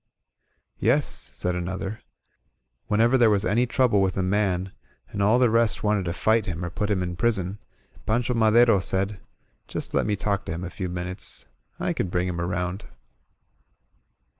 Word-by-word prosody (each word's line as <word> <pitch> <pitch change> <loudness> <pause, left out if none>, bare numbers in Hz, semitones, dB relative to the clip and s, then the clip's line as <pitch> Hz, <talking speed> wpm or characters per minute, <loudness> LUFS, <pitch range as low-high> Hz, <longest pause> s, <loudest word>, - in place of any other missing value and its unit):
"Yes," - - +3
said 90 - -3
another, 95 +4 -4 0.9
"whenever 115 +5 +3
there 120 -2 +6
was 105 -1 +2
any 120 +4 +2
trouble 120 -5 +3
with 95 -1 0
a 95 - +1
man, 95 -1 0 0.4
and 100 - -4
all 105 +4 +4
the 125 -1 +4
rest 115 -1 +2
wanted 105 -3 +1
to 85 - -2
fight 110 +3 +2
him 90 -1 -3
or 85 - -5
put 105 +4 -2
him 95 -3 +1
in 90 -1 -4
prison, 100 -2 -1 0.5
Pancho 120 +2 +1
Madero 115 -1 +5
said: 95 +1 +1
^ 105 -2 -10 0.5
Just - - -5
let - - +1
me 105 - +1
talk 100 0 -1
to - - -4
him 85 +2 -5
a 90 - -5
few 95 -2 -4
minutes. 90 +1 -6 0.3
I - - 0
can - - -1
bring 90 +1 0
him 85 -1 -3
around.' 90 +2 -3
100 Hz, 175 wpm, -25 LUFS, 90-110 Hz, 0.9 s, there